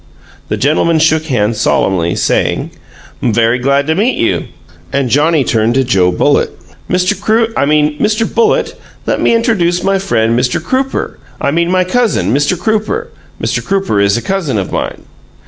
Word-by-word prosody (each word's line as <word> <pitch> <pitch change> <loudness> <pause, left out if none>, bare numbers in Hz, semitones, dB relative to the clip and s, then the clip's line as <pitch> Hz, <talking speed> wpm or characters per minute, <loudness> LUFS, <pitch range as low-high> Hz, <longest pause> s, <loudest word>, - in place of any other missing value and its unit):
The - - -1
gentlemen 155 +4 +2
shook 160 0 +2
hands 115 -6 0
solemnly, 85 -5 +1
saying, - - 0 0.5
"'M 120 - +1
very 115 +2 +2
glad 140 +2 +1
to 160 - +1
meet 215 +9 0
you," - - 0 0.5
and 140 -3 -1
Johnnie 150 +1 +3
turned 115 0 +1
to 135 - +3
Joe 95 -7 +2
Bullitt. 90 - +1 0.4
"Mr. 180 0 +1
Croo 225 +1 +1
I - - +1
mean, 150 0 +1
Mr. 215 +1 +1
Bullitt, 230 +1 +1 0.3
let - - -1
me - - +3
intradooce 190 -7 +1
my 195 0 +1
friend, 115 -12 0
Mr. 125 0 0
Crooper 260 +10 -2 0.2
I - - 0
mean 170 +3 0
my 185 0 +2
cousin, 220 - 0
Mr. 145 +6 +1
Crooper. 220 - -1 0.3
Mr. - - -2
Crooper 195 - 0
is 100 +1 +2
a 120 - -4
cousin 185 - -1
of 95 - -3
mine." - - -4
155 Hz, 170 wpm, -13 LUFS, 120-195 Hz, 0.5 s, Johnnie